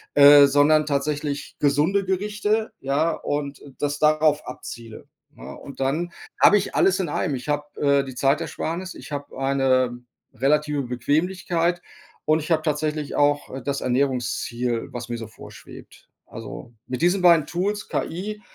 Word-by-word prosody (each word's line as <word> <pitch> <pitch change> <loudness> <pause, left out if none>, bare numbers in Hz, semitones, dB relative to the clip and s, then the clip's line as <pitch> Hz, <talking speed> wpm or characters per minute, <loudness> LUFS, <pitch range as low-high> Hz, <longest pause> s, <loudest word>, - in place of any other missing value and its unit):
äh, 145 0 +9
sondern 145 +2 +4
tatsächlich 145 0 -2
gesunde 150 +8 +2
Gerichte, 210 +3 -1
ja, 145 +5 +1
und 145 -1 -4 0.2
das 145 0 -2
darauf 155 -1 +3
abziele, 115 -3 -9 0.3
ne? - - -10
Und 140 - -11
dann 155 +6 -1 0.3
hab - - +7
ich 200 - 0
alles 190 0 +3
in 185 - -1
einem. 145 -1 -1
Ich 125 +3 -7
hab, 150 0 -3
äh, 140 -1 +3
die 130 -2 -9
Zeitersparnis. 160 +7 -1
Ich - - -11
hab 145 0 -5
eine 130 -2 +1 0.3
relative 145 +3 +1
Bequemlichkeit. 170 +7 -1 0.4
Und 155 +1 +3
ich 155 +2 -6
hab 155 -1 +2
tatsächlich 150 -1 -2
auch, 145 0 +2
äh, 135 - -6
das 140 0 -2
Ernährungsziel, 125 -2 -1
was 120 -1 -6
mir 120 - -3
so 115 - -7
vorschwebt. - - -14 0.2
Also, 115 +2 -9 0.2
mit 130 - -4
diesen 180 +3 +2
beiden 170 -4 +6
Tools, 200 +4 -2
KI 210 +5 -4
145 Hz, 150 wpm, -23 LUFS, 135-165 Hz, 0.4 s, äh